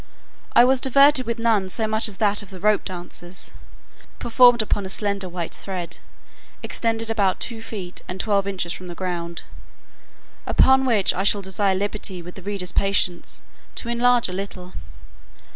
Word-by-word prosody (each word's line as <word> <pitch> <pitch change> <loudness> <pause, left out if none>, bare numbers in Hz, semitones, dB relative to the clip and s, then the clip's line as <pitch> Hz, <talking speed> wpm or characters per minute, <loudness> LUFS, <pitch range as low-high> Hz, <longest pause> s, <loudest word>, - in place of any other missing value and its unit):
I 240 - +7
was 260 0 +2
diverted 275 -1 +5
with 235 0 -2
none 220 -5 +1
so 220 +4 0
much 220 +1 +2
as 200 -3 -7
that 205 -1 +1
of 200 - -12
the 190 -2 -10
rope 210 +2 +2
dancers, 175 0 -6 0.7
performed 240 0 +5
upon 205 -1 -1
a 190 - -6
slender 200 -1 -2
white 175 -1 -5
thread, 180 -3 -5 0.6
extended 225 -1 -2
about 200 -4 +1
two 230 -2 -3
feet, 195 -5 -7
and 180 +1 -6
twelve 200 -2 +1
inches 185 -3 -2
from 185 - -8
the 175 - -7
ground. 170 -2 -4 1.0
Upon 265 0 +4
which 215 -6 +3
I 190 - -1
shall 205 0 +3
desire 190 +1 0
liberty, 195 -2 -3
with 175 +1 -9
the 195 - -11
reader's 195 -1 -3
patience, 195 -3 0 0.3
to 235 - -4
enlarge 240 0 +3
a 180 - -6
little. 185 -1 -7
200 Hz, 165 wpm, -22 LUFS, 185-225 Hz, 1.0 s, I